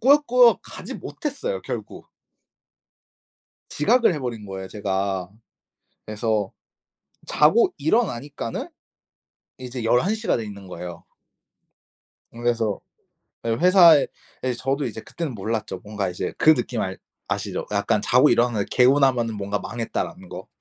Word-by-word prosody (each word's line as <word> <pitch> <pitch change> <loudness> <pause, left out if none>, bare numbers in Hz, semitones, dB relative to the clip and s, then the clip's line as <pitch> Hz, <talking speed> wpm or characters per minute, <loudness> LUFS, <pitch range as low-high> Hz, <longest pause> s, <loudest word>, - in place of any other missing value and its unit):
꾸역꾸역 250 -2 +5
가지 - - -9
못했어요 435 - -4
결국. - - -7 1.6
지각을 240 -7 +3
해 150 - -3
버린 115 -5 -5
거예요 95 -1 -7
제가. 95 -3 -2 0.8
그래서 110 -2 -1 0.8
자고 155 +11 +4
일어나니까는 145 - -1 0.9
이제 125 -1 -6
11 125 - +2
시가 220 0 0
돼 115 - -4
있는 100 -2 -9
거예요. 90 0 -8 1.3
그래서 115 -3 -1 0.7
예 115 - 0
회사에 170 +2 +6 0.4
예 130 - 0
저도 135 +3 -2
이제 110 -2 -5
그때는 165 0 -5
몰랐죠. 110 +2 -3
뭔가 105 -3 -3
이제 90 - -4
그 155 - +6
느낌 120 -6 -2
알 95 0 -3 0.3
아시죠? - - -3
약간 - - +1
자고 130 +4 +4
일어나는데 120 -3 +2
개운하면은 125 -3 +3
뭔가 100 0 -3
'망했다.'라는 115 +2 -5
거. - - -8
120 Hz, 275 characters per minute, -23 LUFS, 105-150 Hz, 1.6 s, 회사에